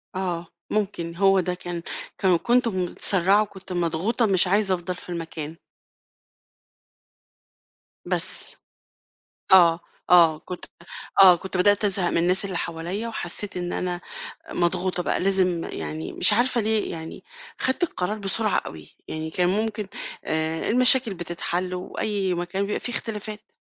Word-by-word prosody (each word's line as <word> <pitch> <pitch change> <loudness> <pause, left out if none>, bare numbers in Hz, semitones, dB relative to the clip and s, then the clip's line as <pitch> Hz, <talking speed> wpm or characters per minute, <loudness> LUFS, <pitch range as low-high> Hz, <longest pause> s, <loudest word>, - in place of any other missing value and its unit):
آه 175 -3 -3 0.2
ممكن، 185 -5 -2
هو 195 +1 +4
ده 180 0 -1
كان 175 -1 -6 0.4
كان 185 -3 +3
كنت 245 +5 +2
متسرَّعة 190 0 +3
وكنت 195 -3 -7
مضغوطة 175 +7 0
مش 190 -3 +3
عايزه 195 0 +2
أفضل 180 +1 -5
في 180 - -11
المكان. 165 -2 -5 2.5
بس. - - 0 1.0
آه، 170 -3 +7 0.3
آه، 165 -3 +6
كنت 180 +2 -8 0.6
آه، 185 -2 +9
كنت 190 +2 -5
بدأت 205 +3 +4
أزهق 190 -3 +2
من - - 0
الناس 180 +3 +3
اللي 190 -3 -3
حواليّا 170 +8 -4
وحسّيت 205 -2 -3
إن 175 0 -3
أنا 180 -1 -3 0.5
مضغوطة 180 +1 0
بقى - - 0
لازم 185 -3 +2
يعني 80 0 -5
مش - - +6
عارفة 240 +2 +2
ليه، 220 0 0
يعني 160 0 -8 0.4
خدت 260 +6 +1
القرار 210 - -2
بسرعة 205 +1 0
أوي، 80 -2 -9 0.2
يعني 160 0 -4
كان 180 +1 +1
ممكن 210 0 -1 0.4
آآ 160 +1 -1
المشاكل 250 -1 +5
بتتحل 175 +1 -3
وأي 190 +1 -2
مكان 175 +3 -2
بيبقى 205 - -2
فيه 245 - -4
اختلافات. 215 -2 -5
185 Hz, 135 wpm, -24 LUFS, 175-205 Hz, 2.5 s, آه